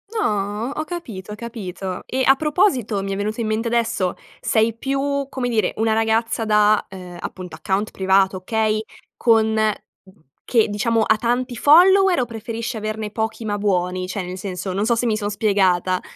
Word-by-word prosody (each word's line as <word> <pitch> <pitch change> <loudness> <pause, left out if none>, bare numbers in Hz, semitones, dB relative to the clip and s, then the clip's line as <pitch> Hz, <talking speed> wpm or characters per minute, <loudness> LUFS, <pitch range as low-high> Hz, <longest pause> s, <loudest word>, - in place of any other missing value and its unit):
No 210 - -1
ho 310 - -2
capito, 220 - -7
ho - - -6
capito. 195 -5 -6
E 260 +1 -1
a 270 - +6
proposito, 285 - +1
mi 195 - -4
è - - -1
venuto 215 +3 -2
in 220 - -1
mente 220 +2 -1
adesso, 230 -6 0 0.2
sei 220 0 +2
più 275 +3 -2
come 250 -3 -2
dire 225 -2 +1
una 220 0 +1
ragazza 225 +1 +1
da, 210 0 +3
ehm, 180 -2 -10
appunto 180 -2 -7
account 190 +6 -1
privato 190 0 +2
okay, 215 +2 0 0.4
con 220 -2 +3 0.9
che 230 -4 +2
diciamo 225 +2 +1
ha 220 0 +3
tanti 245 +2 -1
follower 365 - +6
o - - 0
preferisci 230 0 -5
averne 215 0 -4
pochi 220 +1 -3
ma 205 -1 -2
buoni? 185 -2 0
Cioè 190 +1 -3
nel 180 +1 -6
senso, 185 0 -5
non 200 +3 -1
so 235 0 +2
se 235 - -1
mi 220 -2 +1
son 205 -1 -2
spiegata? 190 -3 +1
220 Hz, 175 wpm, -21 LUFS, 195-235 Hz, 0.9 s, a